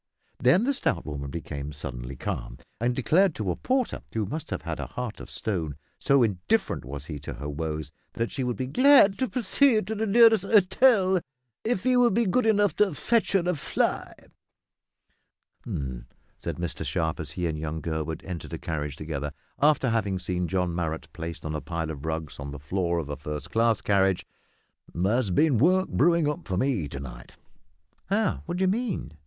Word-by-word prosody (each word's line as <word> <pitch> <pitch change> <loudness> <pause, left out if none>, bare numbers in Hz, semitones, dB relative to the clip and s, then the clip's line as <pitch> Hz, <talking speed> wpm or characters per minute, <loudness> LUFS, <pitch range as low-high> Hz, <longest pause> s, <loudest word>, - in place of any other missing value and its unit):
Then 130 - +4
the 280 +3 +2
stout 85 - -1
woman 70 -2 -5
became 70 -2 -5
suddenly 60 -2 -6
calm, - - -4 0.2
and 120 +2 +1
declared 165 +7 +3
to 100 -4 -1
a - - -2
porter 255 -1 -1
who 110 -2 -1
must 150 +10 -5
have - - -4
had - - -4
a - - -4
heart 125 -3 -5
of - - -9
stone, 85 -9 -3 0.2
so 140 -2 +4
indifferent 95 -6 0
was 70 +3 -6
he 75 -3 -6
to 70 -2 -7
her 70 +4 -6
woes 75 0 -4 0.2
that 115 0 -2
she 135 - -2
would 125 -3 -2
be, 130 - -2
"glad 250 - +6
to 260 -2 0
proceed 245 -1 +3
to 220 - -3
the 220 +1 -1
nearest 225 -1 +6
'otel 195 -1 +4 0.4
if 220 -3 -1
'e 255 0 +4
would 240 -5 +4
be 235 0 +3
good 225 +5 +2
enough 205 -2 +3
to 200 -6 +3
fetch 230 +4 +1
her 195 - +4
a 180 - +2
fly." 145 - -1 1.5
"H'm!" 65 -4 -5 0.3
said - - -4
Mr 85 -2 -3
Sharp, 80 -1 -1
as - - -4
he 90 - -2
and 80 -2 -2
young 80 +1 -3
Gurwood 80 -1 -3
entered 90 -4 -6
a - - -2
carriage 75 -3 -4
together, 75 -2 -4 0.3
after 145 -4 +4
having 100 -4 0
seen 90 -1 -2
John 90 -1 0
Marrot 80 -2 -3
placed 85 -1 -6
on 75 - -3
a 75 - -3
pile 80 -2 -3
of 75 -1 -8
rugs 80 -2 -4
on 70 0 -5
the 70 - -6
floor 85 +4 -1
of 80 -4 -2
a 75 - -3
first 75 +2 -6
class 115 -1 +2
carriage; 95 -2 +2 0.7
"there's 100 +6 +1
been 135 - +3
work 185 +7 +4
brewin' 170 -2 +3
up 150 +4 -3
for 90 - -1
me 110 - +1
to 70 - -7
night." - - -9 0.7
"How? 210 +1 +1
What 175 +1 -2
do 190 - +1
you - - +4
mean?" 210 - -1
100 Hz, 195 wpm, -27 LUFS, -, 1.5 s, glad